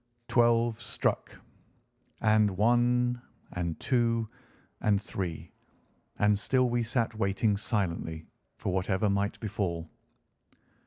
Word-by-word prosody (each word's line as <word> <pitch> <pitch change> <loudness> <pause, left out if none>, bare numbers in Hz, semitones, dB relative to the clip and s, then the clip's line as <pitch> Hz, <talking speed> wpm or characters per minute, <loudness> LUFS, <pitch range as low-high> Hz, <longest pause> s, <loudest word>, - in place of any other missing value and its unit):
Twelve 120 -1 +3
struck, - - -1 0.9
and 105 -3 +3
one 120 +2 +3 0.3
and 85 -2 -3
two 115 -3 +1 0.5
and 100 -2 +2
three, 90 -5 -5 0.7
and 105 -1 +3
still 130 +4 +2
we 120 0 +1
sat 115 0 0
waiting 100 0 +1
silently 85 -7 -2 0.3
for 95 - -2
whatever 95 +2 +1
might 100 +1 -1
befall. 85 -6 -3
105 Hz, 100 wpm, -29 LUFS, 95-120 Hz, 0.9 s, Twelve